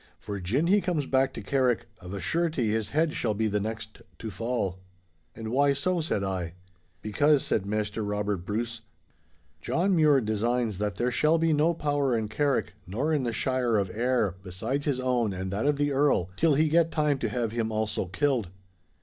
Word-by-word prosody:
For 100 -1 -6
gin 115 - 0
he 200 +4 +4
comes 170 -7 -1
back 135 0 +2
to - - -7
Carrick, 130 -4 +1
of 90 -1 -9
a 100 - -4
surety 160 - 0
his 110 -1 -1
head 155 +1 +1
shall 110 -3 -1
be 110 +2 0
the 105 0 0
next 110 +1 -5 0.2
to 110 - -6
fall.' 100 -3 -2 0.6
'And 110 -1 -6
why 140 +3 +3
so?' 170 +5 0
said 130 -10 -1
I. 90 -3 -3 0.5
'Because,' 145 +7 +3
said 100 -2 0
Maister 105 +1 -2
Robert 105 0 -1
Bruce, 110 +6 -4 0.8
'John 185 - +1
Mure 150 -4 +5
designs 110 -1 0
that 105 -3 -1
there 120 +6 0
shall 155 +6 +3
be 165 -1 +2
no 155 +3 +3
power 145 -5 +1
in 110 -2 -2
Carrick 140 +5 0
nor 130 - -1
in 150 - +2
the 120 - 0
Shire 125 -1 +1
of 100 -2 0
Ayr 115 -5 0
besides 110 +10 -3
his 135 -3 +1
own 125 -5 +1
and 95 0 -4
that 105 +8 -1
of 145 -1 +2
the 145 0 +1
Earl—till 140 - +2
he 155 +3 +3
get 165 +1 +3
time 150 -4 +1
to - - -1
have 120 -3 -1
him 115 -1 -1
also 110 -3 -1
killed. 115 +1 0
120 Hz, 190 wpm, -27 LUFS, 105-145 Hz, 0.8 s, Mure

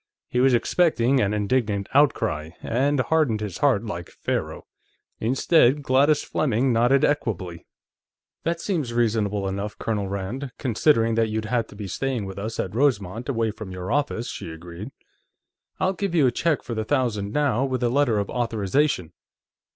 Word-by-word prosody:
He 125 - 0
was 130 0 +5
expecting 135 -2 +2
an 100 -4 +1
indignant 105 -1 0
outcry, 115 - +2
and 140 +4 +1
hardened 135 -5 +1
his 105 -5 -5
heart, - - +2
like - - -5
Pharaoh. - - -4 0.5
Instead, 135 +3 +3
Gladys 140 +3 +3
Fleming 130 -2 +1
nodded 120 +4 +4
equably. 95 - -2 0.8
"That 170 +1 -1
seems 155 - -2
reasonable 105 -4 +1
enough, 100 +2 -4
Colonel 105 -3 -2
Rand, 100 +7 -4
considering 115 -2 +2
that 115 0 +1
you'd 110 0 -2
have 115 0 0
to - - -14
be 105 0 -6
staying 125 +2 -2
with 95 0 -7
us 110 +3 -5
at 95 - -2
Rosemont, 115 -3 0
away 115 -4 0
from 110 -2 -9
your 90 0 -5
office," 140 -4 0
she - - -6
agreed. 85 +6 -8 0.9
"I'll 190 0 +1
give 195 -2 -3
you 155 -5 +5
a 125 - +4
check 160 +4 0
for 120 - -5
the 110 -1 -2
thousand 110 -6 -1
now, 135 -2 +1
with 130 -2 -1
a 120 - +3
letter 125 -3 +2
of 100 -1 -1
authorization." 115 - 0
115 Hz, 165 wpm, -24 LUFS, 105-135 Hz, 0.9 s, was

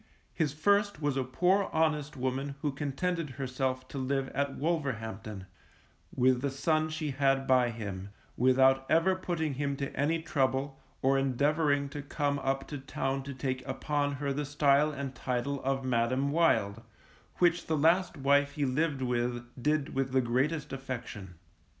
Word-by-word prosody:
His 155 -5 0
first 200 +4 +2
was 145 -3 0
a 135 - +1
poor 180 +9 +2
honest 150 -3 0
woman 130 +2 -2
who 150 - +1
contented 150 +4 -2
herself 130 -1 -2
to 140 - -5
live 135 0 -1
at 140 0 -2
Wolverhampton, 110 - -3 0.7
with 130 0 +3
the 140 - 0
son 155 +3 +1
she 155 -2 -3
had 135 0 +2
by 125 -2 +4
him, 100 -4 -6 0.3
without 130 +1 +4
ever 165 +4 +4
putting 170 -5 -2
him 140 +1 -1
to 140 0 -5
any 155 +4 +1
trouble, 135 -2 -1 0.2
or 135 +1 +4
endeavouring 140 +2 +1
to 145 +1 -6
come 145 0 -1
up 135 0 -1
to 145 - -5
Town 135 0 -2
to 140 +1 -7
take 130 0 -3
upon 145 +1 -1
her 140 0 -2
the 145 +2 -2
style 145 +1 +3
and 140 -2 -5
title 130 +2 -2
of 135 0 -1
Madam 130 +3 +1
Wild, 115 -10 +2 0.5
which 175 -1 +2
the 160 - +1
last 170 +4 +3
wife 140 +1 +3
he 145 -1 0
lived 140 +1 0
with 120 -1 -1 0.2
did 150 +1 0
with 135 -1 -1
the 130 - +4
greatest 135 +6 0
affection. 120 -8 -6
140 Hz, 160 wpm, -30 LUFS, 130-150 Hz, 0.7 s, by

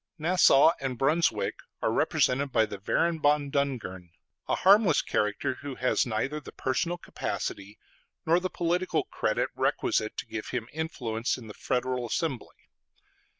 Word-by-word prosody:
Nassau 165 -2 +5
and 135 -3 -3
Brunswick 155 +7 +1 0.2
are - - 0
represented 135 +2 +1
by 110 -2 +3
the 105 -2 -8
Baron 165 +10 0
von 145 -1 +2
Dungern, 120 -11 -2 0.4
a - - +1
harmless 195 -4 +5
character, 105 +4 0
who 140 -2 -6
has 125 0 +1
neither 120 +7 -2
the 150 - -11
personal 170 +7 -1
capacity 100 - -5 0.5
nor 165 +2 +4
the 185 +1 -3
political 175 +2 0
credit - - -1
requisite 110 0 0
to - - -4
give 110 - -6
him 120 -2 -3
influence 125 -8 -2
in 125 - -10
the 105 - -9
Federal 125 +1 -2
Assembly. 135 0 -4
135 Hz, 145 wpm, -28 LUFS, 115-160 Hz, 0.5 s, Nassau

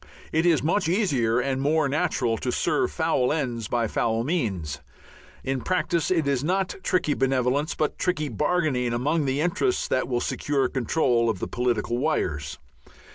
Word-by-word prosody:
It 160 +2 +2
is 165 -6 +3
much 165 +2 +1
easier 135 - +2
and 130 +1 -1
more 155 +1 +2
natural 135 -6 0
to - - -2
serve - - +1
foul 125 0 +1
ends 125 -8 -2
by 120 0 0
foul 115 +1 0
means. 95 - -2 0.6
In 135 -1 -2
practice 175 -3 0
it 165 -5 +1
is 140 -2 +1
not 185 +3 0
tricky 180 -5 +1
benevolence 135 +3 0
but 155 - -1
tricky 180 -5 0
bargaining 140 -2 0
among 145 +6 0
the 135 +2 0
interests 180 - 0
that 130 - +1
will 120 -2 0
secure 135 +1 0
control 120 -2 +1
of 110 - -1
the - - -4
political 120 -1 -1
wires. 75 - -1
135 Hz, 160 wpm, -25 LUFS, 120-160 Hz, 0.6 s, is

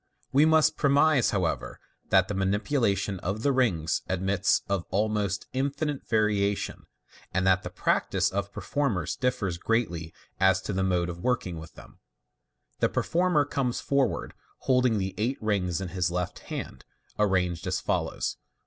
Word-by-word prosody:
We 145 +4 +5
must 160 0 +4
premise, 140 -2 +4
however, 80 - -2 0.3
that 95 -1 +4
the 105 - -3
manipulation 100 0 0
of 100 +6 -3
the 140 - +3
rings 95 - +1
admits 95 +1 +1
of 100 -3 0
almost 105 0 0
infinite 140 +2 -2
variation, 105 -2 0 0.4
and 95 +1 0
that 95 -1 +4
the - - -6
practice - - +1
of 100 +1 -2
performers 120 - -1
differs 100 -9 -1
greatly 90 -8 -1 0.3
as 95 -1 +4
to 105 - -3
the 95 - 0
mode 90 -2 +1
of 85 -1 -6
working 90 -7 -1
them. - - -15 0.8
The - - +3
performer 175 -4 +2
comes 135 -3 -1
forward 140 -1 0 0.3
holding 125 -3 +3
the 95 -1 -2
eight 120 +5 0
rings 95 -6 0
in 95 -2 -4
his 90 -1 0
left 90 0 -3
hand, - - -6 0.4
arranged 90 -3 +1
as 95 - 0
follows. - - -2
100 Hz, 145 wpm, -27 LUFS, 95-125 Hz, 0.8 s, We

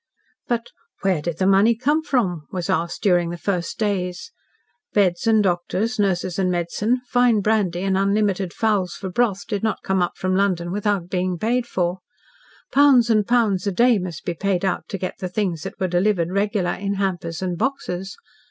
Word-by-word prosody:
But 235 -1 -2 0.3
"where 185 -5 +1
did 165 0 -3
the 185 - 0
money 200 +4 +5
come 290 +7 +1
from?" 190 - -1
was 180 -3 -2
asked 170 +1 -2
during 175 -4 +3
the 175 - -5
first 180 -1 -2
days. 195 - -2 0.6
Beds 185 -2 +2
and 220 -2 +4
doctors, 195 +5 -1
nurses 185 -2 0
and 185 -1 +2
medicine, 180 +8 0
fine 245 -4 +3
brandy 195 -4 +1
and 195 -1 +1
unlimited 195 -1 +1
fowls 200 -5 0
for 190 -2 -6
broth 200 -2 0
did 205 -4 -3
not 220 -1 -2
come 190 -1 +1
up 175 - -1
from 185 0 0
London 185 -3 0
without 205 -2 -1
being 180 0 -1
paid 240 +6 0
for. 180 -3 -1 0.7
Pounds 265 -5 +5
and 215 -2 +2
pounds 215 -6 +2
a - - +1
day 235 +3 +4
must 175 -3 -6
be 175 - -1
paid 190 +2 -1
out 180 - -1
to 195 - -4
get 185 0 -5
the 185 - -4
things 180 -4 -2
that - - -7
were 185 - 0
delivered 180 -1 +1
"regular" 200 -2 0
in 200 0 -3
hampers 180 -3 -2
and 180 -1 -1
boxes. 195 -7 -3
195 Hz, 185 wpm, -22 LUFS, 180-215 Hz, 0.7 s, money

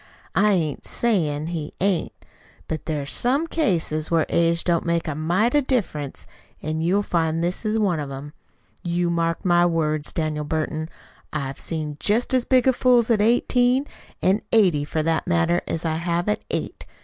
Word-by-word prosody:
"I 210 +2 +4
ain't 160 -6 -2
sayin' 155 -11 0
he 160 -3 -5
ain't. 185 -3 +1 0.6
But 160 -1 -5
there's 145 -3 -2
some 270 +6 +1
cases 170 - 0
where 165 -2 +2
age 170 0 +2
don't 170 -2 +1
make 170 -1 -1
a 155 - -1
mite 175 +10 +1
of 290 -3 +2
difference, 155 - -2 0.3
an' 155 +1 -3
you'll 190 +5 +2
find 165 -3 0
this 180 +5 -2
is 215 +1 +1
one 190 -7 +1
of 145 -2 -4
'em. 140 +2 -8 0.5
You 175 0 0
mark 165 0 -1
my 175 -1 +4
words, 155 -3 +1
Daniel 155 -2 -2
Burton. 155 +1 -2 0.4
I 155 - -2
have 135 0 -6
seen 155 -3 -4
jest 225 +5 +1
as 255 -2 +2
big 260 0 +4
fools 245 -2 +3
at 215 -3 +3
eighteen, 245 +3 +3 0.4
an' 195 +3 +3
eighty, 180 -10 +3
for 155 +1 -2
that 165 +2 0
matter, 170 0 +2
as 165 +1 -3
I 160 -1 0
have 170 +1 -1
at 210 - 0
eight. - - -4
170 Hz, 175 wpm, -23 LUFS, 155-210 Hz, 0.6 s, I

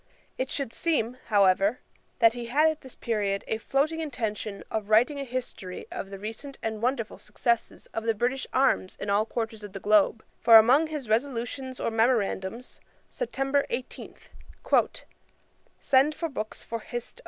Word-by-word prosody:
It 260 - -2
should 275 -5 -3
seem, 270 -8 0
however, 200 +2 +3 0.4
that 230 -1 +5
he 240 -1 -6
had 295 +6 +4
at 315 - -9
this 260 - -12
period 205 -4 -1
a 220 - -1
floating 295 +7 0
intention 220 -9 -4
of 215 -2 -3
writing 245 +7 +4
a - - -2
history 245 -8 -5
of 195 - -5
the 195 - -7
recent 225 +7 -7
and 220 -1 -3
wonderful 240 -2 -1
successes 235 -1 -1
of 225 - -3
the 225 -1 +2
British 250 +4 -1
arms 260 -8 +2
in 200 - -2
all 210 +2 +2
quarters 225 -2 -4
of 205 -2 -9
the 195 - -5
globe; 210 +2 +3 0.2
for 230 - +7
among 255 +8 +7
his 300 -5 -5
resolutions 255 +2 -2
or - - -1
memorandums, 225 -1 0 0.3
September 280 - 0
18, 245 +2 -5 1.6
'send 275 +3 +3
for 330 - -3
books 220 -6 -5
for 230 - -4
Hist. 240 - -7
235 Hz, 160 wpm, -27 LUFS, 215-270 Hz, 1.6 s, for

